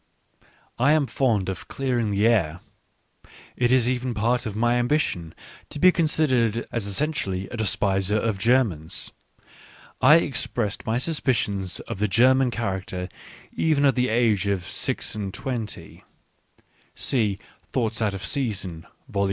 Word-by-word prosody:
I 135 +5 +4
am 155 -2 +3
fond 115 -8 0
of 95 -2 -5
clearing 125 -5 -1
the 100 +1 +1
air. 90 -8 +2 1.0
It 120 0 +1
is 130 -2 +4
even 125 -1 -1
part 120 +3 0
of 105 - -5
my 120 +2 +2
^ambition 120 - -1 0.4
to - - -7
be 185 +5 +6
considered 130 - +1
as 115 -4 -2
essentially 100 -5 -2
a 120 - -6
despiser 100 -1 +1
)of 110 -2 -1
Germans. 110 -10 +1 0.9
I 140 +4 +8
expressed 115 -10 -1
my 110 +1 +1
suspicions 115 - -1
of - - -7
the 105 - +1
German 130 +5 +4
character 95 -5 -4 0.4
even 150 -3 +2
at 135 - +5
the 125 0 0
age 110 -4 +2
of 100 -3 0
six - - -2
and 100 -2 -4
twenty 120 -1 -6 0.9
(see 110 -7 +1 0.3
Thoughts 115 -3 -1
out 105 -3 0
of 95 - -5
Season, 95 - -2 0.2
vol. 100 - -4
115 Hz, 140 wpm, -24 LUFS, 100-130 Hz, 1.0 s, I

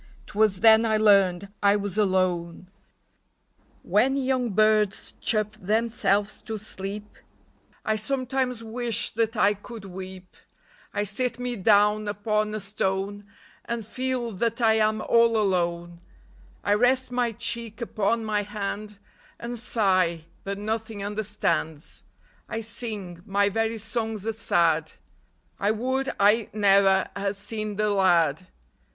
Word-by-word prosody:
'T - - -15
was 210 -3 +2
then 220 0 +7
I 220 -1 +2
learned 200 -2 +3
I 200 0 +4
was 205 -2 -3
alone! 185 -3 0 1.1
When 240 +9 +2
young 260 -2 0
birds 215 -1 +2
chirp 215 -2 0
themselves 210 0 0
to 220 -1 -3
sleep, 205 0 -7 0.7
I 215 0 +1
sometimes 255 0 -2
wish 230 0 0
that 225 0 -1
I 205 0 +4
could 210 +1 -10
weep; 185 0 -9 0.6
I 205 - -1
sit 235 +4 0
me 245 0 -3
down 210 +1 +3
upon 210 +1 -1
a - - -2
stone 200 0 -2 0.4
And 235 -2 -3
feel 255 0 -2
that 230 +4 -1
I 225 -2 +4
am 215 0 +1
all 230 -1 +4
alone; 175 -4 -1 0.6
I 205 - +2
rest 250 +4 +2
my 245 -1 0
cheek 230 0 -1
upon 225 -1 -1
my 210 -1 0
hand 210 0 -5 0.4
And 240 +1 -5
sigh, 185 -8 +1 0.2
but 200 0 -4
nothing 220 0 -4
understands; 205 -7 -2 0.5
I 225 0 -3
sing 210 -6 -5
— - - -29
my 200 0 +4
very 225 +2 -1
songs 220 -1 -4
are 225 - -1
sad; 165 -7 +1 0.7
I 200 - +1
would 260 +5 -1
I 210 +2 +4
ne'er 195 -2 +4
had 200 0 -2
seen 215 +1 -4
the 210 +1 +1
lad 175 -4 +2
210 Hz, 135 wpm, -25 LUFS, 195-225 Hz, 1.1 s, then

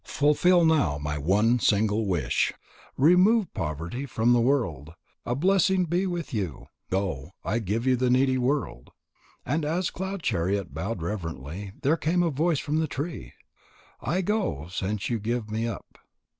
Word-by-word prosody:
Fulfil 165 +4 +3
now 150 - +3
my 75 +1 -3
one 105 - +3
single 105 0 +2
wish. 80 -10 +1 0.5
Remove 180 - +4
poverty 85 - -4
from 115 0 +2
the 120 - +4
world. 100 - 0 0.3
A 120 - 0
blessing 190 +3 +3
be 175 +3 0
with 175 -5 -4
you. 95 - -4 0.2
Go. 90 -5 -2
I 110 +4 0
give 110 +3 -2
you 130 -1 +4
to 125 +1 0
the - - +2
needy 130 +1 +3
world." 125 - -1 0.6
And 150 +4 0
as 170 +4 -1
Cloud 190 -1 -5
chariot 95 -1 -1
bowed 90 +3 -4
reverently, 85 0 -5
there 155 +5 +3
came 170 +3 +1
a 170 - +1
voice 160 +3 +1
from 150 +2 -1
the 160 - 0
tree: 145 - -5 0.7
"I 180 +4 0
go, 190 - -1
since 100 +2 -2
you 115 - 0
give 110 0 -3
me 110 +2 -1
up." 115 -5 -8
120 Hz, 160 wpm, -26 LUFS, -, 0.7 s, Remove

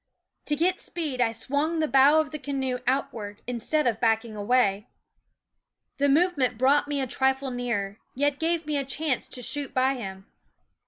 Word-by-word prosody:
To 295 - +1
get 355 +5 +1
speed 305 -7 -3
I 230 -2 +3
swung 285 +8 -1
the 315 -1 +1
bow 280 +3 +6
of 305 -2 -1
the 305 - -5
canoe 265 -2 -2
out 275 +1 +1
ward, 205 -2 -8
instead 250 +6 -1
of 230 -3 +1
backing 225 -1 +1
away. 210 -1 +1 1.1
The 285 0 +2
move 355 +5 +3
ment 250 -3 +1
brought 275 +4 +3
me 290 -1 -1
a 265 - 0
trifle 265 +1 0
nearer, 230 -5 -3 0.2
yet 285 +1 0
gave 330 0 0
me 300 -1 -1
a 280 - 0
chance 275 0 -2
to 250 - -6
shoot 285 +2 -2
by 260 +1 +3
him. 195 -6 -7
265 Hz, 180 wpm, -26 LUFS, 240-290 Hz, 1.1 s, bow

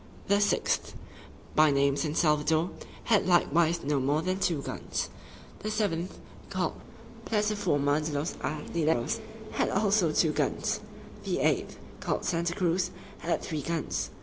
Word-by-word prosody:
The 200 +1 +4
sixth, 205 - +1 0.6
by 155 0 +6
name 140 0 +3
San 150 +1 -1
Salvador, 155 +1 +2 0.3
had 210 -4 +3
likewise 170 -1 +3
no 145 0 +1
more 145 +4 +1
than 185 +1 -1
two 165 -7 0
guns. - - -3 0.5
The 215 - -3
seventh, 190 -5 -1 0.3
called - - -1 0.5
Plattaforma 190 -10 +1
de 155 - -2
los 150 +4 -1
Artilleros, 155 -3 -1 0.3
had - - +1
also 195 -4 +3
two 155 0 +3
guns. - - 0 0.4
The - - -1
eighth, - - +1 0.2
called - - -2
Santa 170 +1 0
Cruz, 180 -2 +1 0.3
had 170 - -1
three 155 -2 -3
guns. 165 +2 -2
165 Hz, 135 wpm, -29 LUFS, 150-185 Hz, 0.6 s, by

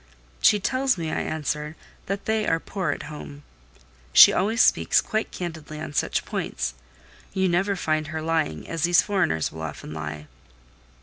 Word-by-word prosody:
"She 210 - +5
tells 260 +3 +1
me," 160 -2 -3
I - - -1
answered, 150 0 -3 0.3
"that 195 +1 -3
they 220 -1 0
are 165 - +2
poor 185 -1 -3
at 145 - -2
home; 145 -1 -9 0.7
she - - +10
always 220 +5 0
speaks - - +4
quite 220 0 -2
candidly 160 -3 -6
on 155 - -6
such - - 0
points: - - -3 0.6
you 190 0 +2
never 190 +3 +1
find 155 -3 -1
her 160 +1 -4
lying, 160 - -1
as 165 -1 -4
these 175 +1 +5
foreigners 185 - 0
will 80 - -9
often 75 -1 -6
lie. 75 -1 -6
160 Hz, 165 wpm, -25 LUFS, 150-195 Hz, 0.7 s, she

